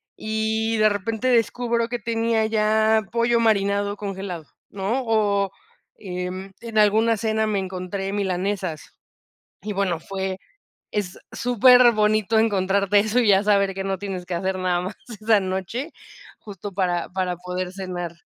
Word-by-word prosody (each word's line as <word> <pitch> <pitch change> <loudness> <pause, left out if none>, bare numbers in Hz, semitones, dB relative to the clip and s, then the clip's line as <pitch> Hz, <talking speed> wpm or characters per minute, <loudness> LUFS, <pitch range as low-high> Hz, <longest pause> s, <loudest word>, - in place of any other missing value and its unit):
y 220 +1 -1
de 215 0 +5
repente 220 +5 -2
descubro 235 0 +1
que 245 0 -3
tenía 225 0 0
ya 220 0 +2
pollo 235 0 +2
marinado 200 -2 +1
congelado, 190 -6 -5 0.2
¿no? 210 +7 -2
O 200 -3 +1 0.5
en, 185 0 -6
en 230 -2 -5
alguna 220 +2 +4
cena 220 0 0
me 205 -2 0
encontré 190 +1 -4
milanesas. 190 -4 -3 0.7
Y, 210 - -4
bueno, 190 -4 -1
fue, 190 +1 -4 0.5
es 200 -4 -3 0.2
superbonito 230 -3 +4
encontrarte 200 -1 +2
eso, 220 +4 +1
y 235 - +2
ya 195 0 +5
saber 200 -2 +2
que 195 - -4
no 195 0 -2
tienes 190 -2 -5
que 175 -1 -3
hacer 190 +2 -1
nada 180 -1 +1
más 190 +3 -5 0.3
esa 215 -1 +4
noche, 190 - -3 0.5
justo, 205 -1 -8
para 180 -2 -1
para 185 -1 -2
poder 180 +1 -5
cenar. 180 -3 -5
200 Hz, 140 wpm, -23 LUFS, 190-220 Hz, 0.7 s, de